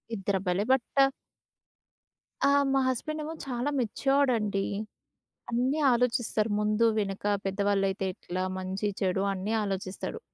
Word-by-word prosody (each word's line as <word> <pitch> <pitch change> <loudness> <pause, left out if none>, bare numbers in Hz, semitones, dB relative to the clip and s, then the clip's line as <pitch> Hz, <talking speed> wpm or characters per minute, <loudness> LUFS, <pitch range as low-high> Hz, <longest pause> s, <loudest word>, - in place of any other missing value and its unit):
ఇద్దరు 195 -1 0
అబ్బాయిలే. 185 +2 0
బటా 270 +1 +2 1.4
ఆ! - - +5 0.2
మా 270 - +4
హస్బెండ్ 305 +5 -2
ఏమో 310 +2 -5
చాలా 250 +1 -2
మెచ్యూర్డ్ 270 +4 +2
అండి. 205 -3 0 0.9
అన్నీ 250 +5 +1
ఆలోచిస్తారు. 235 -2 +1
ముందు-వెనక 210 -2 +1 0.2
పెద్దవాళ్ళైతే 195 0 0
ఎట్లా, 180 +1 -4 0.2
మంచి-చెడు 190 0 -1
అన్నీ 195 +3 -2
ఆలోచిస్తాడు. 195 -2 -4
210 Hz, 105 wpm, -28 LUFS, 195-245 Hz, 1.4 s, ఆ